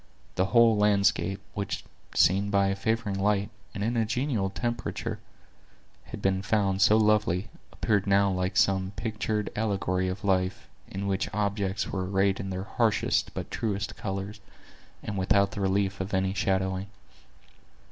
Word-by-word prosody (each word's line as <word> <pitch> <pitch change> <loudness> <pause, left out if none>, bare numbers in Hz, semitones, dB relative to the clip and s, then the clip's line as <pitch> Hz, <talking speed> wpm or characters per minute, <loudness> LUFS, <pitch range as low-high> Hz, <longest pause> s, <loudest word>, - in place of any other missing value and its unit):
The 95 - +1
whole 115 +1 +5
landscape, 100 -1 +2
which, 100 -1 -3 0.3
seen 100 +3 +4
by 100 -1 +3
a 95 - 0
favoring 105 -1 -1
light, 100 +1 +1 0.2
and 100 - -3
in 115 +3 0
a 115 - +2
genial 110 -2 -1
temperature, 120 +4 -3 0.9
had - - -9
been 95 0 +2
found 100 -1 +1
so 105 +2 +6
lovely, 105 -2 +2 0.2
appeared 105 -2 0
now 100 0 +4
like 90 0 -1
some 95 0 +2
pictured 110 -1 -2
allegory 95 -4 0
of 95 +2 -4
life, 95 -1 0 0.2
in 95 +1 -5
which 95 -1 -1
objects 100 -1 -1
were 95 -1 -2
arrayed 95 0 +2
in 95 - -4
their 95 0 -3
harshest 110 0 +1
but - - -5
truest 100 -3 -2
colors, 100 +1 -5 0.6
and 100 -2 -3
without 100 +1 +3
the 100 - -5
relief 95 0 0
of 95 +1 -3
any 95 0 +1
shadowing. 95 0 0
100 Hz, 150 wpm, -28 LUFS, 95-105 Hz, 0.9 s, so